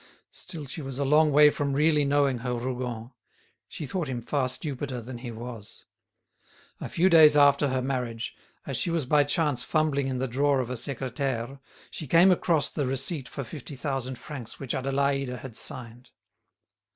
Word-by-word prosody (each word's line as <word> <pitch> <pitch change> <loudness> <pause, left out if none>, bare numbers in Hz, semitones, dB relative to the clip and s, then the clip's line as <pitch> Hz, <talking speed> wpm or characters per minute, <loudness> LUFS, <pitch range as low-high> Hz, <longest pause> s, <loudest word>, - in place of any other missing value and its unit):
Still 155 -4 -7
she 140 +4 -6
was 135 -2 -6
a 140 - 0
long 150 +2 +4
way 150 +1 +7
from 140 -1 -2
really 150 +1 +3
knowing 140 -3 +2
her 125 0 -2
Rougon; 120 -1 -4 0.6
she 155 - -7
thought 160 +4 -3
him 125 -3 -4
far 130 0 0
stupider 135 -1 -3
than 120 +1 -8
he 120 0 -6
was. 115 -2 -9 0.9
A - - -6
few 175 +3 +2
days 155 -4 +7
after 145 0 +5
her 130 -1 -1
marriage, 125 -3 -3 0.3
as 135 -4 -3
she - - 0
was 165 -4 0
by 145 +3 +4
chance 145 -3 0
fumbling 150 -4 +1
in 130 -1 -2
the 130 +1 -1
drawer 140 +3 +2
of 125 -1 -3
a - - -2
secretaire, 130 0 -3 0.3
she 155 - -6
came 170 +7 +6
across 170 -3 +2
the 145 -4 -2
receipt 135 +2 -2
for 140 - -5
fifty 140 +3 -9
thousand 130 -2 -3
francs 130 -6 -9
which 135 -3 -3
Adélaïde 135 -1 0
had 130 -4 -9
signed. 120 0 -5
135 Hz, 175 wpm, -27 LUFS, 125-145 Hz, 0.9 s, way